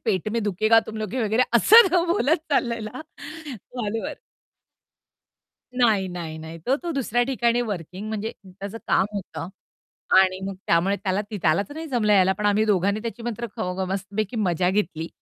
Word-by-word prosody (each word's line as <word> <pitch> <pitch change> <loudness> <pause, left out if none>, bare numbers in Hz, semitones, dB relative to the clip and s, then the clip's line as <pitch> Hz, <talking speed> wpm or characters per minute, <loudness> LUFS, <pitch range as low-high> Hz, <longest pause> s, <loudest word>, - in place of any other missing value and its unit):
पेट 205 -2 0
में 230 -2 0
दुखेगा 215 +3 +3
तुम 220 - -7
लोग 215 -2 -4
के. 255 0 -1
वगैरे 220 +3 +2
असं 365 - +7
बोलत 330 -3 +3
चालललेला 235 -3 -1 0.5
कॉलवर. 225 -2 -5 1.6
नाही, 210 -6 +3
नाही, 170 -3 -6
नाही 160 +1 -8
तो 265 - +3
तो 345 - -3
दुसऱ्या 245 -3 0
ठिकाणी 240 -2 +1
वर्किंग 195 -1 -5
म्हणजे 220 +1 -3
त्याचं 200 +4 -8
काम - - +3
होतं 185 -3 -6 0.7
आणि 190 0 +3
मग 195 - -5
त्यामुळे 185 +4 +2
त्याला 195 0 -1
ती 210 - -4
त्यालाच 170 - +2
नाही 320 +1 -6
जमलं 225 -6 +2
यायला 190 -1 +5
पण 210 - 0
आम्ही 210 +1 +3
दोघांनी 200 0 +1
त्याची 230 0 -6
मात्र 235 0 -4
ख - - -6 0.2
ग 190 - 0
मस्तपैकी 200 +3 -3
मजा 180 -3 +1
घेतली 175 -5 -1
210 Hz, 165 wpm, -24 LUFS, 190-235 Hz, 1.6 s, असं